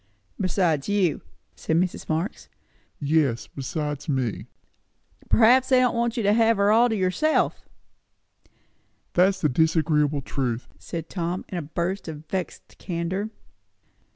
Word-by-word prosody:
"Besides 180 -6 0
you," 195 -7 +1 0.3
said 160 - -2
Mrs. 180 +1 -1
Marx. 165 +7 -3 0.5
"Yes, 145 -5 +1
besides 150 +2 -5
me." 130 -6 -1 0.8
"Perhaps 250 +3 +5
they 260 -1 +5
don't 250 -2 +3
want 235 0 0
to 235 -2 -2
let 200 - +3
you - - +3
have 230 -1 +4
her 200 +1 +3
all 235 +3 +5
to 220 - 0
yourself." 205 +12 0 1.4
"That's 190 +2 +3
the 155 - +3
disagreeable 150 -1 +2
truth!" 125 -4 -3
said 165 -1 -6
Tom 175 0 -3
in 180 - -3
a - - -3
burst 170 +6 -3
of 155 -1 -7
vexed 185 -1 -5
candour. 185 +4 -3
175 Hz, 135 wpm, -25 LUFS, 150-205 Hz, 1.4 s, Perhaps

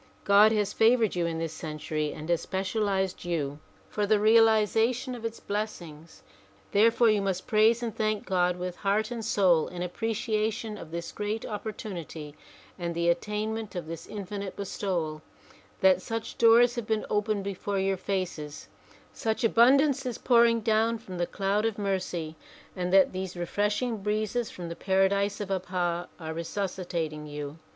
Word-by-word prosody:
God 205 +2 +6
has 205 -2 0
favored 225 -2 +3
you 175 -1 0
in 165 -1 -3
this 165 -1 -3
century 155 -1 -3
and 155 - -8
has 170 -1 +2
specialized 190 -1 -1
you 150 -5 -2 0.3
for 210 -1 -1
the 215 - +5
reali 220 +1 +5
zation 235 +5 0
of 235 - -10
its 230 0 -4
blessings. 170 -7 -6 0.5
Therefore 225 +2 +5
you 210 -1 +2
must 190 -2 -2
praise 225 +2 +3
and 230 -2 -3
thank 215 -1 -1
God 180 -2 +1
with 180 0 -5
heart 215 +3 0
and 235 -2 -4
soul 185 -7 +3
in 180 0 -5
appreciation 215 +2 -2
of 170 -6 -9
this 170 +1 -5
great 210 +1 -3
opportunity 190 -8 -6 0.5
and 170 -1 -3
the 170 0 +1
attainment 210 +4 -2
of 175 -3 -4
this 165 0 -7
infinite 200 -1 -6
bestowal; 175 -6 -3 0.6
that 185 -1 +5
such 225 +3 -5
doors 235 +1 +6
have 235 -3 -5
been 220 -1 0
opened 210 -1 0
before 200 0 -3
your 195 0 +1
faces, 180 -6 -4 0.4
such 220 0 -2
abundance 270 +5 +4
is 250 -4 -3
pouring 235 -2 +4
down 225 +1 +2
from 185 -5 -9
the 175 - 0
cloud 200 +2 0
of 225 -2 -1
mercy 185 -5 -2 0.4
and 180 -1 -2
that 190 0 +5
these 185 -1 -5
refreshing 210 +6 -1
breezes 215 +3 -1
from 175 -1 -7
the 170 - -6
paradise 195 +2 +1
of 205 -2 -4
Abha 180 -2 -1
are 160 -1 -5
resuscitating 170 -3 -3
you. 145 +1 -6
200 Hz, 160 wpm, -28 LUFS, 175-220 Hz, 0.6 s, God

